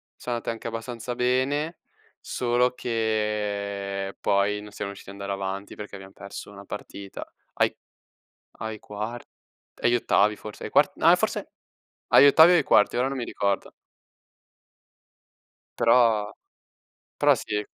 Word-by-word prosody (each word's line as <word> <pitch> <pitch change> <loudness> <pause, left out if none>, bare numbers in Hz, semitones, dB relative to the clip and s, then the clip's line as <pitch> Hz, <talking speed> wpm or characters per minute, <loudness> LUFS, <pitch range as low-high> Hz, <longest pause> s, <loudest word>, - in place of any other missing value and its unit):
sono 120 -1 -4
andate 115 - -4
anche 115 - -8
abbastanza 115 +1 -5
bene, 130 +6 0 0.4
solo 125 0 +1
che 105 -4 -2
poi 105 +1 +1
non 105 0 -11
siamo 100 0 -5
riusciti 100 - -12
ad 100 - -12
andare 100 0 -2
avanti 95 +1 -5
perché 105 -1 -8
abbiam 95 0 -11
perso 100 0 -9
una 100 0 -11
partita 100 -1 -8 0.3
ai - - +2 0.8
ai 110 0 -5
quart 105 +4 -6 0.6
agli 120 0 +4
ottavi 105 -2 +2
forse, 105 -1 -9
ai - - -5
quart - - +4
no - - 0
a - - +8
forse - - -2 0.6
agli 140 - +7
ottavi 160 +4 +8
o - - +6
ai - - +4
quarti, 105 - +4
ora 125 +2 +2
non 135 0 -3
mi 120 - -2
ricordo. 100 -3 -1 2.1
Però 115 -3 +4 0.9
però - - +5
sì. 105 -1 -3
105 Hz, 140 wpm, -26 LUFS, 100-120 Hz, 2.1 s, a